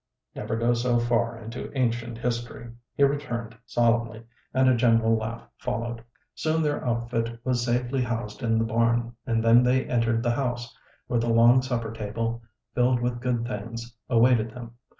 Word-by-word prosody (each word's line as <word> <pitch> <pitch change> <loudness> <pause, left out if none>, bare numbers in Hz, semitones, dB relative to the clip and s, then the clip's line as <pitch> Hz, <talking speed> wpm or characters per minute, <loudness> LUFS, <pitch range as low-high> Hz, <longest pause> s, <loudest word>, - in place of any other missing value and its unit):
"Never - - -3
go 115 +1 +2
so 120 0 +1
far 120 -1 +1
into 115 +2 -7
ancient 120 -2 -1
history," 120 -1 -4 0.2
he 140 - +3
returned 120 -5 -1
solemnly, 115 -1 +1 0.3
and 130 0 +3
a 130 - +5
general 115 -1 +3
laugh 115 +1 -5
followed. 115 +1 -3 0.3
Soon 160 0 0
their 150 -1 -1
outfit 115 -1 -2
was 125 -2 0
safely 125 +2 0
housed 115 -2 -3
in 115 -2 +1
the 115 - +1
barn, 115 +1 +1
and 115 -2 +1
then 115 +1 +6
they 125 +1 +2
entered 115 -1 +1
the 120 - +2
house, 120 -1 -3 0.3
where 120 - 0
the 115 +1 0
long 120 +2 +6
supper 120 -4 -2
table, 115 +2 -3 0.3
filled 125 0 +2
with 120 0 -2
good 120 -2 0
things, 115 0 -6
awaited 115 -2 +4
them. 115 0 -9
120 Hz, 165 wpm, -26 LUFS, 115-125 Hz, 0.3 s, then